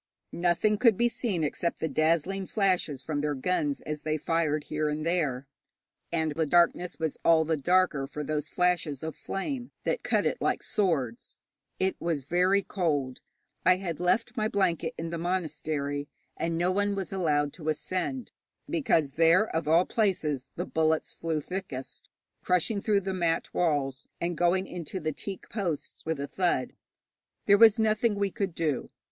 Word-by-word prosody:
Nothing 180 Hz, +5 st, +2 dB
could 230 Hz, -5 st, +5 dB
be 240 Hz, -, +4 dB
seen 205 Hz, -9 st, -2 dB
except 170 Hz, +3 st, -1 dB
the 160 Hz, -, 0 dB
dazzling 165 Hz, +6 st, +1 dB
flashes 180 Hz, -, 0 dB
from 145 Hz, -1 st, -2 dB
their 150 Hz, -1 st, -1 dB
guns 185 Hz, -, 0 dB
as 150 Hz, -1 st, -5 dB
they 155 Hz, 0 st, -1 dB
fired 155 Hz, -1 st, 0 dB
here 155 Hz, 0 st, -1 dB
and 150 Hz, +1 st, -3 dB
there, 150 Hz, -7 st, 0 dB, 0.7 s
and 160 Hz, -2 st, 0 dB
the 160 Hz, +1 st, 0 dB
darkness 175 Hz, +2 st, +3 dB
was 160 Hz, -2 st, -3 dB
all 160 Hz, -1 st, +5 dB
the 160 Hz, +1 st, +1 dB
darker 155 Hz, -2 st, +2 dB
for 150 Hz, +1 st, -5 dB
those 150 Hz, 0 st, -2 dB
flashes 175 Hz, -6 st, 0 dB
of 160 Hz, 0 st, -4 dB
flame, 245 Hz, +5 st, -4 dB
that -, -, 0 dB
cut -, -, +1 dB
it -, -, -1 dB
like -, -, 0 dB
swords. 145 Hz, -, -1 dB, 0.4 s
It 190 Hz, 0 st, 0 dB
was 165 Hz, -5 st, -1 dB
very 180 Hz, +7 st, +2 dB
cold. 145 Hz, -11 st, -1 dB, 0.4 s
I 180 Hz, +1 st, +6 dB
had 180 Hz, -4 st, -4 dB
left 225 Hz, +7 st, +1 dB
my 215 Hz, -3 st, +1 dB
blanket 190 Hz, -6 st, 0 dB
in 165 Hz, 0 st, -4 dB
the 170 Hz, -, -3 dB
monastery, 155 Hz, -5 st, -2 dB, 0.3 s
and 165 Hz, +1 st, -2 dB
no 175 Hz, +2 st, +2 dB
one 205 Hz, +1 st, +1 dB
was 195 Hz, -1 st, -4 dB
allowed 150 Hz, -6 st, +1 dB
to 155 Hz, -3 st, -4 dB
ascend, 185 Hz, -, -2 dB, 0.4 s
because 225 Hz, -, +1 dB
there, 165 Hz, +8 st, +4 dB
of 160 Hz, -1 st, -1 dB
all 165 Hz, +3 st, +5 dB
places, 165 Hz, -, 0 dB
the 175 Hz, -, -3 dB
bullets 160 Hz, -2 st, 0 dB
flew 160 Hz, -2 st, -2 dB
thickest, 180 Hz, -8 st, -6 dB, 0.3 s
crushing 180 Hz, +4 st, +1 dB
through 205 Hz, -2 st, +2 dB
the 190 Hz, 0 st, -3 dB
mat 170 Hz, -3 st, 0 dB
walls, 145 Hz, -6 st, 0 dB
and 170 Hz, 0 st, -1 dB
going 175 Hz, +3 st, +2 dB
into 180 Hz, 0 st, -5 dB
the 155 Hz, -2 st, -2 dB
teak 195 Hz, +6 st, -7 dB
posts 180 Hz, -9 st, -3 dB
with 160 Hz, -3 st, -1 dB
a 140 Hz, -, -2 dB
thud. 180 Hz, +4 st, 0 dB, 0.7 s
There 200 Hz, 0 st, +6 dB
was 225 Hz, -1 st, +8 dB
nothing 220 Hz, 0 st, +2 dB
we 200 Hz, -1 st, 0 dB
could 195 Hz, -3 st, -3 dB
do. 155 Hz, -6 st, -1 dB
170 Hz, 170 wpm, -28 LUFS, 155-190 Hz, 0.7 s, was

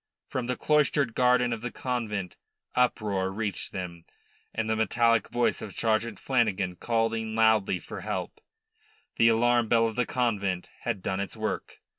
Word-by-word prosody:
From 125 Hz, -2 st, -3 dB
the 125 Hz, -, -1 dB
cloistered 150 Hz, -4 st, +2 dB
garden 125 Hz, 0 st, +3 dB
of 115 Hz, -, -5 dB
the 120 Hz, -, -3 dB
convent 110 Hz, -8 st, -3 dB, 0.4 s
uproar 105 Hz, -6 st, +1 dB
reached 105 Hz, 0 st, -3 dB
them, 85 Hz, -3 st, -6 dB, 0.5 s
and 110 Hz, -1 st, -2 dB
the 110 Hz, -, +1 dB
metallic 115 Hz, +1 st, +2 dB
voice 120 Hz, 0 st, +1 dB
of 105 Hz, -, -6 dB
Sergeant 110 Hz, -1 st, 0 dB
Flanagan 105 Hz, -8 st, 0 dB
calling 115 Hz, +1 st, -1 dB
loudly 110 Hz, -4 st, +3 dB
for -, -, -8 dB
help. -, -, -4 dB, 0.8 s
The 115 Hz, -, +5 dB
alarm 120 Hz, +1 st, +3 dB
bell 115 Hz, 0 st, +4 dB
of 110 Hz, -1 st, -2 dB
the 125 Hz, -1 st, 0 dB
convent 100 Hz, -7 st, -1 dB
had 95 Hz, -, -3 dB
done 95 Hz, 0 st, -1 dB
its 100 Hz, +3 st, -4 dB
work. 110 Hz, 0 st, -4 dB
115 Hz, 155 wpm, -28 LUFS, 100-120 Hz, 0.8 s, The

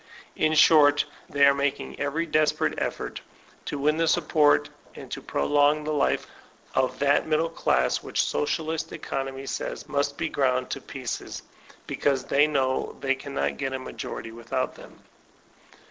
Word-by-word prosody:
In 155 Hz, 0 st, +2 dB
short, 145 Hz, -2 st, +6 dB, 0.2 s
they 140 Hz, -1 st, +4 dB
are 140 Hz, -, +6 dB
making 140 Hz, 0 st, -2 dB
every 145 Hz, +4 st, -1 dB
desperate 155 Hz, -1 st, +1 dB
effort -, -, -4 dB, 0.4 s
to 145 Hz, -, -3 dB
win 150 Hz, +2 st, +1 dB
the 165 Hz, 0 st, +2 dB
support, 150 Hz, -1 st, +3 dB, 0.3 s
and -, -, -10 dB
to -, -, -4 dB
prolong 145 Hz, -, +2 dB
the 155 Hz, +1 st, -2 dB
life, 145 Hz, -, +1 dB, 0.5 s
of 130 Hz, -1 st, +1 dB
that 140 Hz, +2 st, +2 dB
middle 160 Hz, +1 st, +1 dB
class 65 Hz, -, +1 dB
which -, -, 0 dB
socialistic 160 Hz, +1 st, -2 dB
economy 135 Hz, 0 st, -4 dB
says -, -, -4 dB
must 140 Hz, 0 st, -1 dB
be 170 Hz, -, -1 dB
ground 130 Hz, -3 st, 0 dB
to -, -, -4 dB
pieces, -, -, -6 dB, 0.4 s
because 135 Hz, -3 st, 0 dB
they 145 Hz, +3 st, +3 dB
know 135 Hz, -3 st, -1 dB
they 135 Hz, 0 st, +1 dB
cannot 140 Hz, +1 st, -3 dB
get 135 Hz, -1 st, -2 dB
a -, -, -1 dB
majority 120 Hz, -3 st, -7 dB
without 115 Hz, 0 st, -3 dB
them. -, -, -15 dB
145 Hz, 150 wpm, -26 LUFS, 135-150 Hz, 0.5 s, short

